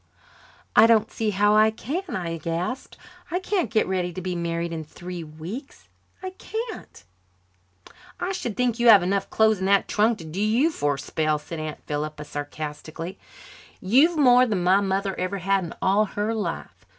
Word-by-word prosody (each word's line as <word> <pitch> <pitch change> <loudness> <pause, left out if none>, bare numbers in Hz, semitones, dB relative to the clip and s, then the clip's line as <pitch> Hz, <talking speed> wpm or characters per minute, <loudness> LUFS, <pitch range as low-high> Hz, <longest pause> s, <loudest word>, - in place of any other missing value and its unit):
"I 225 - +8
don't 225 -1 +3
see 220 -1 -1
how 205 +1 +3
I 215 +1 +6
can," 320 - -4
I 170 -3 -3
gasped. 170 +10 -4 0.3
"I 350 - -1
can't 370 -1 -1
get 220 -1 +2
ready 180 -1 -1
to 185 - -5
be 185 0 -3
married 170 0 -2
in 160 -1 -4
three 175 +3 -8
weeks. 160 - -9 0.3
I 375 - -4
can't 440 - -7 0.6
" 95 - -23
"I 355 +2 -2
should 240 - -4
think 245 -2 0
you 240 - +3
have 205 -5 +8
enough 195 +2 -1
clothes 220 -2 +3
in 190 - -2
that 200 0 +3
trunk 215 +2 +2
to 165 - -10
do 165 +5 -4
you 235 +10 +3
for 145 - 0
a - - -9
spell," 155 +2 0
said 155 +2 -8
Aunt 155 -1 -6
Philippa 150 0 -4
sarcastically. 155 +4 -6 0.6
"You've 275 - +4
more 250 -3 +6
than 200 -6 -1
my 190 +3 +4
mother 195 0 -1
ever 185 +2 -2
had 195 0 +1
in 165 - -8
all 200 +3 +3
her 210 +2 -2
life. 220 -2 -5
195 Hz, 185 wpm, -24 LUFS, 165-225 Hz, 0.6 s, I